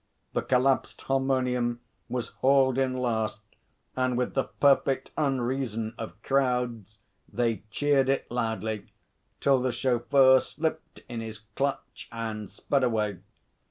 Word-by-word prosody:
The - - +1
collapsed 130 +1 +1
harmonium 125 -3 0 0.3
was 125 -2 -3
hauled 135 -1 +3
in 130 -1 0
last, 110 -3 -1 0.5
and 130 -1 +1
with 125 - -1
the 135 - +1
perfect 135 -1 +2
unreason 125 -5 -1
of 110 -1 -7
crowds, 125 -6 0 0.3
they 115 -2 0
cheered 140 +1 +2
it 135 - +1
loudly, 110 -3 -2 0.5
till 135 -2 +4
the 130 0 +1
chauffeur 130 +2 +4
slipped 160 +2 -4
in 115 -1 -5
his 110 -2 -7
clutch 140 0 -3
and 110 -3 -4
sped 140 -2 -1
away. 105 -6 0
125 Hz, 125 wpm, -28 LUFS, 115-135 Hz, 0.5 s, till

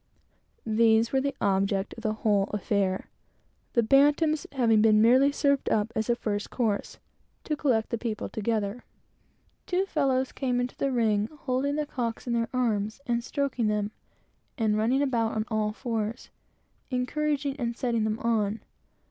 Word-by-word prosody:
These 225 0 +3
were 265 - +3
the 280 0 -2
object 195 0 0
of 230 - -10
the 215 -2 0
whole 205 -2 +3
affair; 200 -2 -1 0.6
the 235 - +3
two - - -5
bantams 295 +3 +3
having 230 -5 +3
been 215 -1 +5
merely 255 +5 +5
served 280 -1 +1
up 215 +1 +1
as 220 +2 -1
a 240 - +4
first 205 -3 -3
course, 220 -5 -2 0.5
to 305 - -1
collect 250 -7 0
the 235 - -1
people 225 -3 -3
together. 215 +1 -2 0.8
Two 370 +1 +1
fellows 265 -7 0
came 250 -3 -1
into 245 0 -3
the 275 - -1
ring 215 -4 +1
holding 270 +2 0
the 300 0 -1
cocks 240 -5 -4
in 240 - -1
their 230 -1 0
arms, 220 -3 -1
and 235 -1 0
stroking 265 -4 -1
them, 210 0 0 0.7
and 220 -3 +1
running 240 +6 +2
about 230 -5 0
on 215 0 -1
all 215 -1 0
fours, 225 -1 -4 0.6
encouraging 280 +2 -1
and 235 -1 -2
setting 235 -3 0
them 215 0 -1
on. 220 -2 0
230 Hz, 160 wpm, -27 LUFS, 215-265 Hz, 0.8 s, been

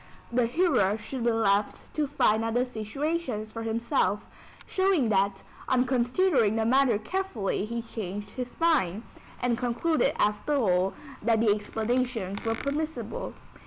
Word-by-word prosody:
[The 240 -1 +2
hearer 245 - +2
should 235 +3 -5
be 235 - +4
left 210 -2 0
to 300 -2 0
find 225 -6 +2
out 225 0 -1
the 245 +1 +3
situations 250 0 -3
for 230 - -6
himself,] 225 -2 0 0.4
showing 375 - +2
that, 195 -1 +1 0.3
on 255 -1 +3
considering 250 - +2
the 225 0 +1
matter 255 -2 +4
carefully 220 - -2
he 235 +1 -4
changed 205 -3 -6
his 250 -1 -6
mind, 255 - +2 0.4
and 240 -1 +1
concluded 250 +7 +1
after 210 +8 +1
all, 190 -7 +2 0.3
that 225 0 +2
the 220 -2 +4
explanations 220 -1 -2
were 225 0 0
permissible. 310 - -3
230 Hz, 140 wpm, -28 LUFS, 210-270 Hz, 0.4 s, be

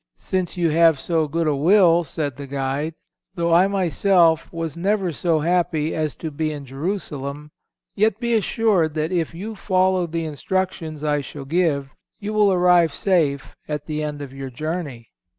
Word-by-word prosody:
—"Since 185 -2 -2
you 170 -2 +2
have 165 -2 +4
so 160 -1 0
good 165 +3 -1
a 150 -2 +1
will," 175 +2 +5
said 145 -3 -3
the 140 +1 -8
guide, 140 +3 -2 0.4
"though 170 -2 +1
I 180 +3 +6
myself 180 -3 +2
was 165 -3 -4
never 190 +1 0
so 160 0 0
happy 160 -2 0
as 155 -2 -2
to 160 - -6
be 155 +1 -2
in 145 -2 -7
Jerusalem, 145 -1 -5 0.4
yet 215 +1 +1
be 235 -1 0
assured 205 -7 +1
that 155 +2 -1
if 170 -2 -1
you 210 +6 -6
follow 185 -2 +1
the 165 0 -3
instructions 160 0 -3
I 145 -1 +1
shall 140 0 -9
give, 145 -4 0 0.3
you 210 +1 -4
will 210 -2 +4
arrive 175 -4 +4
safe 155 -8 0
at 150 -1 -4
the 155 -1 -3
end 145 -1 -4
of 135 -2 -9
your 135 -1 -6
journey." 145 -3 -5
165 Hz, 170 wpm, -22 LUFS, 150-180 Hz, 0.4 s, I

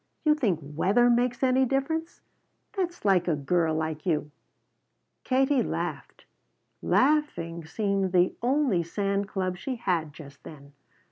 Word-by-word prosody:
"You 305 - +6
think 230 - 0
weather 195 +12 +2
makes 245 +2 +1
any 260 0 +3
difference? 275 +6 -2 0.5
That's 355 - -3
like 185 -3 +3
a 165 - +2
girl 160 +2 0
like 155 -1 -3
you!" 150 -4 -1 0.9
Katie 265 +1 +2
laughed. - - -5 0.6
Laughing 255 - +1
seemed 195 +1 -1
the 180 0 +3
only 255 -6 +2
sand 200 +3 -2
club 185 -3 -3
she 255 +7 -4
had 175 -9 -1
just 140 -2 -13
then. 140 -2 -12
195 Hz, 130 wpm, -27 LUFS, 165-260 Hz, 0.9 s, You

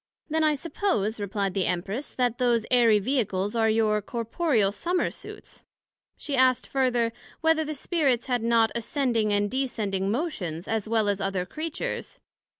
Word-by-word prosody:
Then 320 0 +2
I 305 -1 +3
suppose, 270 - -1
replied 200 -1 -2
the 190 -1 0
Empress, 195 +9 -3
That 245 -2 -1
those 240 -3 +2
airy 235 -4 +5
Vehicles, 205 -3 -1
are 225 -1 +3
your 215 -1 +2
corporeal 230 - 0
Summer 345 - -1
suits. - - -11 0.6
she 285 - -3
asked 255 -1 +3
further, 245 -4 +1 0.3
Whether 320 0 +3
the 310 0 -4
Spirits 275 -5 0
had 245 -2 0
not 230 -1 +3
ascending 235 -2 0
and 205 0 +1
descending 210 -7 -1
motions, 200 - -3
as 220 -1 -2
well 220 -2 +2
as 200 -1 0
other 195 -2 -1
Creatures? 325 - -5
230 Hz, 155 wpm, -26 LUFS, 205-270 Hz, 0.6 s, airy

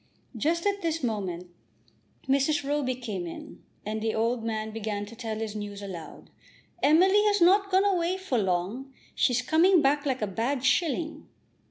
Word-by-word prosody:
Just 330 - 0
at 400 0 0
this 330 -3 -2
moment 185 -6 -3 0.8
Mrs. 280 +1 +1
Roby 285 -3 0
came 210 -8 -5
in, 165 - -10 0.2
and 215 +1 -3
the 220 0 -1
old 230 +1 0
man 220 -1 -3
began 210 -2 -4
to 220 +3 -12
tell 225 -2 -4
his 220 -1 -4
news 205 -1 -6
aloud. 175 -5 -9 0.5
"Emily 375 +8 +5
has 410 -1 +3
not 395 +3 +4
gone 380 +1 +3
away 365 -2 +1
for 375 -11 -1
long. 195 +8 -2 0.2
She's 250 0 +1
coming 340 +6 +4
back 290 0 +2
like 260 -4 -1
a - - +3
bad 240 +7 -2
shilling." 315 +2 0
255 Hz, 165 wpm, -27 LUFS, 215-330 Hz, 0.8 s, Emily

